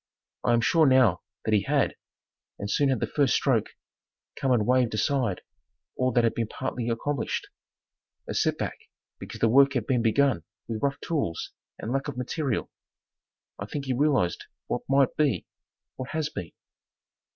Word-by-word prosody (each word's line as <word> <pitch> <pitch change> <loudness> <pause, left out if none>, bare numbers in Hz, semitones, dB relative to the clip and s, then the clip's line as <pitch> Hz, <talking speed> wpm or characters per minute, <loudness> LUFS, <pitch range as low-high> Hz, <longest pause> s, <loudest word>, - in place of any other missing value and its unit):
I 120 - +3
am 120 - +3
sure 160 +5 +4
now 125 -10 +4 0.2
that 110 - +1
he 105 - +4
had, - - +1 0.6
and 100 +1 -4
soon 140 -1 +3
had 130 -4 +1
the - - +2
first 140 -6 +2
stroke - - +2 0.7
come 135 - 0
and 115 -4 +3
waived 125 -2 +2
aside 125 -5 0 0.5
all 130 0 +1
that 120 - +4
had 115 - +2
been 115 -2 -1
partly 125 0 -3
accomplished. 130 +4 -2 0.8
A - - -3
set - - +1
back - - -4 0.4
because - - -9
the 115 - +5
work 140 +4 +5
had 125 -5 -1
been 125 -1 +1
begun 115 - +2 0.2
with 110 -2 -4
rough 140 -1 0
tools 140 - -2 0.3
and 110 - -5
lack 135 +2 -1
of 140 -4 -5
material. 130 0 -2 0.9
I 100 - -5
think 140 +4 -4
he 130 - 0
realized 135 - +1 0.2
what - - -2
might 135 -1 +3
be 145 -6 +1 0.5
what 130 - -5
has 155 -1 -1
been. 90 - -6
130 Hz, 170 wpm, -27 LUFS, 115-140 Hz, 0.9 s, the